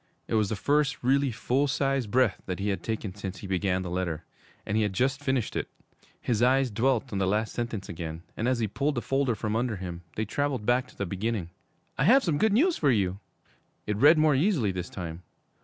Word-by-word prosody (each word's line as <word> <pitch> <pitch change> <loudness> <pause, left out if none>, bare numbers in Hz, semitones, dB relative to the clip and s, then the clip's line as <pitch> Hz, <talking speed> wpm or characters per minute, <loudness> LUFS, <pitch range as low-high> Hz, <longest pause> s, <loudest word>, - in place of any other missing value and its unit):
It - - -4
was 105 -3 +2
the 110 - -1
first 145 +5 +1
really 135 +2 +3
full 125 +5 0
sized 135 -4 0
breath 125 -3 +2
that 90 -2 -2
he 100 +1 -1
had 95 -3 -1
taken 110 -2 -3
since 95 -1 -6
he - - -9
began 95 0 0
the 90 - -5
letter 90 -4 -2 0.4
and 100 - -2
he 110 - +3
had 105 -2 0
just 135 +7 0
finished 130 -5 0
it. - - -2 0.5
His 115 -3 -1
eyes 130 0 +3
dwelt 120 +1 0
on 100 - -1
the 95 - +1
last 105 +3 0
sentences 115 -5 -3
again, 80 -1 -6
and 115 - -1
as 130 -1 +2
he 115 -2 0
pulled 140 +8 -1
the 120 - -2
folder 135 -3 +1
from 110 +1 -2
under 120 -1 0
him, 90 -2 -6
they 110 - -1
traveled 135 0 -1
back 125 +2 +2
to - - -19
the 100 - -2
beginning. 95 -1 -3 0.5
'I 135 - +3
have 260 +8 +6
some 155 -5 0
good 220 - +3
news 320 - +3
for 145 - +2
you!' 100 -5 +1 0.7
It 105 - -1
read 145 +9 +6
more 155 -1 +4
easily 140 - +2
this 90 -1 -5
time. 85 -2 -6
115 Hz, 225 wpm, -28 LUFS, 95-135 Hz, 0.7 s, have